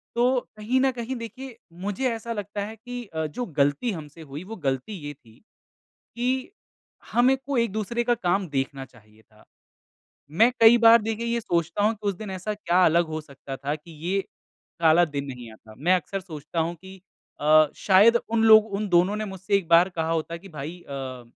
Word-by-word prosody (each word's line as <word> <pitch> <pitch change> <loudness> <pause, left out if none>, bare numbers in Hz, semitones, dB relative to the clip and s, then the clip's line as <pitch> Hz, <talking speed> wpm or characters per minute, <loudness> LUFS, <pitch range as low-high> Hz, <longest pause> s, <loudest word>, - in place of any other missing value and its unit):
तो 250 +2 +3 0.2
कहीं 235 +5 0
न 270 -1 +3
कहीं 250 +3 -4
देखिए 255 0 -10 0.3
मुझे 245 +6 -1
ऐसा 230 +1 -5
लगता 205 -1 -4
है 220 +2 -8
कि 245 +2 -7
अ, 160 -5 -4
जो 245 +11 -5
गलती 145 - 0
हमसे 160 -2 -9
हुई 150 +2 -8
वो 220 +4 -8
गलती 135 +11 -2
ये 145 - -5
थी 115 -5 -22 0.8
कि 255 +6 -1 0.6
हम 245 +2 +4
एक 265 - +1
को 280 -3 -1
एक-दूसरे 235 +1 -1
का 240 - +2
काम 195 -3 0
देखना 135 -1 -3
चाहिए 110 -4 -22
था। 110 -1 -24 0.9
मैं 225 +9 +4
कई 225 +1 +8
बार 230 0 +7
देखिये 225 +2 -3
ये 235 - 0
सोचता 170 0 -1
हूँ 220 +2 +3
कि 210 0 -6
उस 195 - 0
दिन 210 0 -7
ऐसा 190 +3 -4
क्या 185 -3 +2
अलग 170 +2 +3
हो 155 0 -4
सकता 140 -2 -9
था 145 +2 -3
कि 155 +3 -14 0.2
ये 195 +2 +1 0.6
काला 165 +2 +5
दिन 140 -3 -4
नहीं 125 -4 -8
आता। 110 0 -16
मैं 175 +7 +2
अक्सर 185 +3 -3
सोचता 160 -2 -6
हूँ 165 +2 -1
कि 190 +3 -13 0.5
अ, 155 +1 +6
शायद 210 +5 +5
उन 225 -1 +1
लोग 220 -1 +8
उन 210 +1 -2
दोनों 180 +3 +3
ने 215 - -3
मुझसे 190 0 -2
एक 185 - -5
बार 170 +2 +6
कहा 165 -3 -3
होता 165 +1 -2
कि 195 +3 -14
भाई 155 +3 -7
अ, 130 -3 -6
185 Hz, 200 wpm, -25 LUFS, 155-225 Hz, 0.9 s, कई